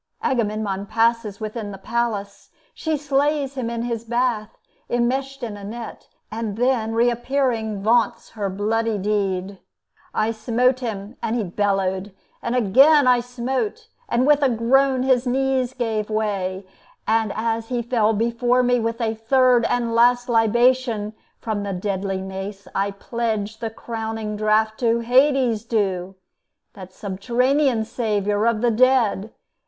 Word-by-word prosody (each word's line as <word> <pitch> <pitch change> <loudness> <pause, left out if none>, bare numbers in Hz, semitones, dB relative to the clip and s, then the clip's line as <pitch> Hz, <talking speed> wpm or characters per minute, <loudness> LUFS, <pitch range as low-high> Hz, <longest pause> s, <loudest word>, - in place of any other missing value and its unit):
Agamemnon 210 -5 -1
passes 230 -2 +1
within 215 -1 -5
the 195 - -8
palace; 210 -1 -3 0.2
she 315 -1 -2
slays 285 0 0
him 255 -4 -3
in 235 0 -3
his 235 -2 -3
bath, 235 -2 -1 0.3
enmeshed 265 +3 -1
in 220 -3 -4
a 205 - -10
net, 230 +3 -8 0.2
and 220 -2 -4
then, 240 -2 +1
reappearing, 235 -3 0
vaunts 230 +1 +1
her 205 -3 -3
bloody 220 +3 -1
deed: 195 -1 -1 0.5
"I 215 +1 0
smote 240 +3 +1
him, 220 -2 -5
and 225 - -1
he 235 - 0
bellowed; 195 0 -1 0.3
and 235 - -2
again 270 +7 +5
I 250 -1 +5
smote, 250 - -3 0.2
and 245 +2 +2
with 295 0 +4
a 275 - +4
groan 255 +3 +2
his 260 -1 +2
knees 260 0 0
gave 220 -4 -2
way; 200 -3 -2 0.4
And 220 -1 +2
as 225 0 -1
he 245 -2 -1
fell 225 -2 +2
before 235 +3 +1
me, 245 0 +2
with 230 +1 -2
a 225 -1 0
third 245 +1 +3
And 235 -1 0
last 245 +1 +4
libation 235 -1 +2 0.2
from 215 -2 -3
the 200 -1 -3
deadly 190 0 -2
mace, 195 +1 -7
I 200 +1 0
pledged 220 +1 -3
the 225 - -2
crowning 220 -1 -5
draught 215 +1 +1
to 235 -1 +2
Hades 255 -2 +3
due, 195 -5 -1 0.6
That 190 -2 -11
subterranean 240 +6 0
Saviour 210 -2 0
of 230 -2 +1
the 240 -1 +3
dead! 230 -3 +2
230 Hz, 140 wpm, -22 LUFS, 210-245 Hz, 0.6 s, again